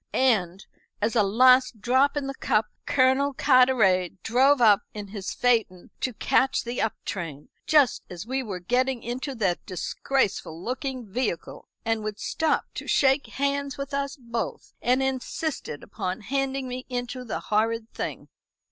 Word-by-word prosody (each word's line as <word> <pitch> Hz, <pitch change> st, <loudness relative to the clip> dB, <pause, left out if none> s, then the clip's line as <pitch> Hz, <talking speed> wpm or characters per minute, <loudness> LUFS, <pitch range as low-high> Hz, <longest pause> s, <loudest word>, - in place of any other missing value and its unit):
And, 195 Hz, -8 st, +1 dB, 0.3 s
as 220 Hz, +3 st, 0 dB
a 225 Hz, -, +5 dB
last 255 Hz, +3 st, +5 dB
drop 260 Hz, +6 st, +2 dB
in 285 Hz, -, -1 dB
the 275 Hz, -, -3 dB
cup, 220 Hz, -5 st, +1 dB, 0.2 s
Colonel 265 Hz, +1 st, +3 dB
Carteret 220 Hz, -, +3 dB
drove 265 Hz, +4 st, +4 dB
up 215 Hz, -4 st, +6 dB
in 205 Hz, -1 st, -6 dB
his 200 Hz, -2 st, -5 dB
phaeton 225 Hz, -7 st, 0 dB
to 255 Hz, -3 st, -2 dB
catch 265 Hz, +5 st, +2 dB
the 240 Hz, +1 st, -3 dB
up 220 Hz, -, 0 dB
train 165 Hz, -7 st, -5 dB, 0.2 s
just 295 Hz, -5 st, +4 dB
as 180 Hz, +1 st, -7 dB
we 265 Hz, +3 st, -1 dB
were 200 Hz, -7 st, -5 dB
getting 250 Hz, +6 st, 0 dB
into 260 Hz, +4 st, -4 dB
that 190 Hz, -6 st, 0 dB
disgraceful 185 Hz, -3 st, -1 dB
looking 255 Hz, +4 st, -4 dB
vehicle, 210 Hz, -4 st, -3 dB, 0.2 s
and 225 Hz, -1 st, 0 dB
would 210 Hz, -1 st, -4 dB
stop 315 Hz, -2 st, 0 dB
to -, -, -7 dB
shake 270 Hz, 0 st, +3 dB
hands 280 Hz, 0 st, -1 dB
with 275 Hz, +1 st, -6 dB
us 280 Hz, 0 st, -2 dB
both, 235 Hz, -2 st, -5 dB
and 255 Hz, +2 st, +2 dB
insisted 265 Hz, -, -3 dB
upon 185 Hz, +4 st, -4 dB
handing 270 Hz, +3 st, -2 dB
me 255 Hz, 0 st, -6 dB
into 245 Hz, 0 st, -4 dB
the 235 Hz, -, -4 dB
horrid 225 Hz, +1 st, 0 dB
thing." -, -, -5 dB
245 Hz, 155 wpm, -26 LUFS, 210-265 Hz, 0.3 s, up